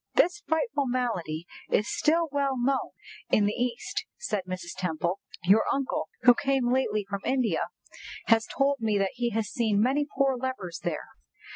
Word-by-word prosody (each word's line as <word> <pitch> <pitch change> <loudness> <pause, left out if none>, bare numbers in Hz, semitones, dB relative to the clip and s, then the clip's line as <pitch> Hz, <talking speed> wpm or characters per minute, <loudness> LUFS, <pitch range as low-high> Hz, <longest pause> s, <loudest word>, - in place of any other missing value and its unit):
"This 345 0 +3
frightful 320 - 0
malady 185 -11 -2 0.2
is 210 - +2
still 330 +2 +2
well 280 -2 0
known 265 +2 +1 0.4
in 210 - +4
the 205 - +1
East," 245 -1 -2
said 190 +4 -2
Mrs. 185 -1 -5
Temple. 180 0 -1 0.2
"Your 200 +5 +5
uncle, 275 -1 -1
who 245 - +8
came 260 -1 +1
lately 215 -6 +1
from 200 0 -4
India, 245 -10 +1 0.6
has 225 0 +4
told 280 0 +1
me 220 -2 +1
that 195 -1 +1
he 240 -1 -1
has 225 -2 -1
seen 220 -4 +1
many 270 +6 +2
poor 270 -1 +3
lepers 240 -10 -4
there. 165 -3 -3
240 Hz, 160 wpm, -28 LUFS, 200-270 Hz, 0.6 s, who